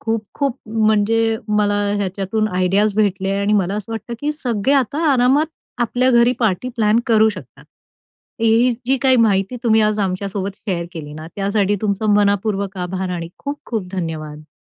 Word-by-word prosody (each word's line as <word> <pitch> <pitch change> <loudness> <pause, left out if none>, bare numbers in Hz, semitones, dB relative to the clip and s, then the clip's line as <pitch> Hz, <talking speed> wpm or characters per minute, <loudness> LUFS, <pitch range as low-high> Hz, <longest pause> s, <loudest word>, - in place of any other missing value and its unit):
खूप-खूप 225 +4 -2
म्हणजे 220 +1 +2 0.2
मला 205 -1 +2 0.2
ह्याच्यातून 200 +2 -1
आयडियाज 195 +3 +1
भेटले 195 -2 +1
आणि 200 +1 +1
मला 195 -2 +1
असं 210 +1 -5
वाटतं, 225 +2 -5
की 295 +1 -1
सगळे 255 -3 0
आता 275 +3 0
आरामात 265 +5 +3 0.3
आपल्या 245 +2 +1
घरी 240 0 +4
पार्टी 220 +2 0
प्लॅन 220 0 +3
करू 220 -1 +4
शकतात. 215 - -9 0.8
ही 230 +2 +4 0.2
जी 265 +2 +3
काही 260 -1 +5
माहिती 210 0 +2
तुम्ही 220 -1 +4
आज 215 0 +1
आमच्यासोबत 195 +1 -3
शेअर 175 -4 -3
केली 150 -4 -8
ना, 155 +1 -8
त्यासाठी 200 0 +1
तुमचं 210 0 0
मनःपूर्वक 200 -1 +1
आभार 185 +1 -3
आणि 170 -2 -4
खूप-खूप 245 -9 -5
धन्यवाद. 155 -4 -5
210 Hz, 150 wpm, -19 LUFS, 195-230 Hz, 0.8 s, काही